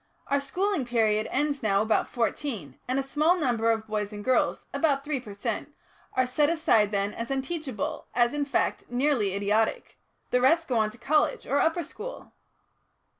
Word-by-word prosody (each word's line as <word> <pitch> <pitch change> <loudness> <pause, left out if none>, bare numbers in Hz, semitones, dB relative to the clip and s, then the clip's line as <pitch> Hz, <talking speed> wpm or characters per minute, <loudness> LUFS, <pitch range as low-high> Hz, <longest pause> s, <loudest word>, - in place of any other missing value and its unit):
Our 280 - +1
schooling 355 +4 -1
period 220 -3 +1
ends 285 +1 0
now 200 -1 +2
about 220 0 +1
fourteen, 230 - -3
and 255 +1 0
a - - 0
small 305 +6 +2
number 240 -8 +1
of 225 -1 +1
boys 210 -1 -2
and 205 0 -8
girls 260 0 +1
about 280 -4 +1
three 295 -2 -2
per 210 -5 -10
cent. 200 - -4 0.4
are 255 - +2
set 290 +4 +2
aside 270 -11 +3
then 200 0 0
as 230 0 -5
unteachable, 290 +1 -3
as, 240 +1 +3
in 295 -1 0
fact, 280 - 0
nearly 245 -6 +1
idiotic; 210 +2 0 0.3
the 250 - +3
rest 330 +6 +4
go 245 -3 +1
on 215 -1 +2
to 215 - -14
a - - -28
college 305 - +1
or 285 - +1
upper 325 +2 +2
school." 455 +11 -9
255 Hz, 180 wpm, -27 LUFS, 220-295 Hz, 0.4 s, rest